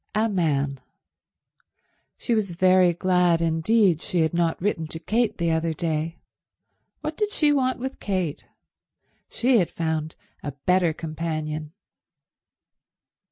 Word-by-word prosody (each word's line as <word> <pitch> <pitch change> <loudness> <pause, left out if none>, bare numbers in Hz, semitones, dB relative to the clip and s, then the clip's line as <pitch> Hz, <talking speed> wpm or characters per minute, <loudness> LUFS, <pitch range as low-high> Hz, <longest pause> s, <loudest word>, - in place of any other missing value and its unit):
A 220 +1 +3
man. 145 -8 0 1.4
She 240 - -1
was 200 -6 -1
very 185 0 +5
glad 180 -1 +2
indeed 165 +2 +2
she 175 - 0
had 160 0 +1
not 170 -1 +1
written 170 -4 -1
to 160 - -6
Kate 225 +6 0
the 170 -1 0
other 160 0 0
day. 160 0 -2 0.8
What 310 0 -4
did 420 +3 -1
she 300 -7 +3
want 260 -2 +1
with 265 +2 -5
Kate? 185 -7 -2 0.9
She 245 -1 +3
had 175 - +1
found 160 -1 -3 0.3
a 145 - -5
better 180 -2 +3
companion. 155 -1 -4
170 Hz, 125 wpm, -24 LUFS, 160-205 Hz, 1.4 s, very